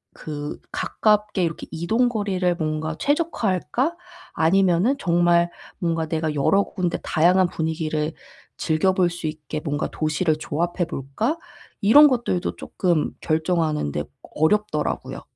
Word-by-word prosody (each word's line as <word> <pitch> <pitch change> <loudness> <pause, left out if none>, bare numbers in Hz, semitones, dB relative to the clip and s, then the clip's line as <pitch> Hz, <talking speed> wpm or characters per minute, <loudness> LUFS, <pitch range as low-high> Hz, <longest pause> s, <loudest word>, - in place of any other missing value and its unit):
그 150 -1 -6
'가깝게 210 -2 +1
이렇게 165 -1 -3
이동 225 +10 +1
거리를 190 -5 0
뭔가 155 -1 -2
최적화할까? 280 - 0 0.4
아니면은 190 - +3
정말 175 -1 +3 0.3
뭔가 165 -2 0
내가 155 -1 -1
여러 195 +8 +3
군데 180 -3 -2
다양한 180 +3 +3
분위기를 160 -1 -2 0.5
즐겨볼 180 +3 +2
수 170 -2 -5
있게 155 0 -5
뭔가 145 -2 -2
도시를 155 +1 0
조합해 175 +4 -2
볼까?' 215 - -2 0.4
이런 285 +9 +8
것들도 235 -8 -1
쪼끔 175 -5 0
결정하는데 155 - 0 0.3
어렵더라고요. 160 -1 0
170 Hz, 290 characters per minute, -23 LUFS, 155-195 Hz, 0.5 s, 이런